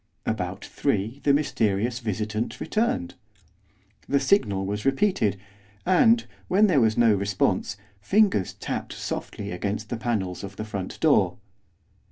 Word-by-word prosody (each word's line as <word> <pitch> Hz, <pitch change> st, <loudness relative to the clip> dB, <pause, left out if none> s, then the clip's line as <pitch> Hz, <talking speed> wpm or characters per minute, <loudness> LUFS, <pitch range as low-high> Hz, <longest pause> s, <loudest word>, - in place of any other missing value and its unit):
About -, -, -3 dB
three 110 Hz, +8 st, -1 dB
the 145 Hz, -, +4 dB
mysterious 115 Hz, -5 st, +1 dB
visitant 110 Hz, 0 st, -3 dB
returned. 215 Hz, -, -1 dB, 1.0 s
The 140 Hz, -, +3 dB
signal 100 Hz, -, +2 dB
was 105 Hz, +2 st, -3 dB
repeated, 135 Hz, -, +1 dB, 0.5 s
and, 225 Hz, +6 st, +4 dB, 0.2 s
when 200 Hz, +4 st, +4 dB
there 160 Hz, -10 st, +4 dB
was 110 Hz, -1 st, +2 dB
no 115 Hz, -2 st, +5 dB
response, 100 Hz, 0 st, 0 dB, 0.2 s
fingers 190 Hz, -, +2 dB
tapped -, -, -5 dB
softly 100 Hz, 0 st, -5 dB
against 100 Hz, +4 st, -3 dB
the 120 Hz, -, -2 dB
panels 105 Hz, -6 st, -2 dB
of 100 Hz, 0 st, -7 dB
the 110 Hz, -, -5 dB
front 100 Hz, -3 st, -5 dB
door. -, -, +3 dB
110 Hz, 130 wpm, -25 LUFS, 100-140 Hz, 1.0 s, no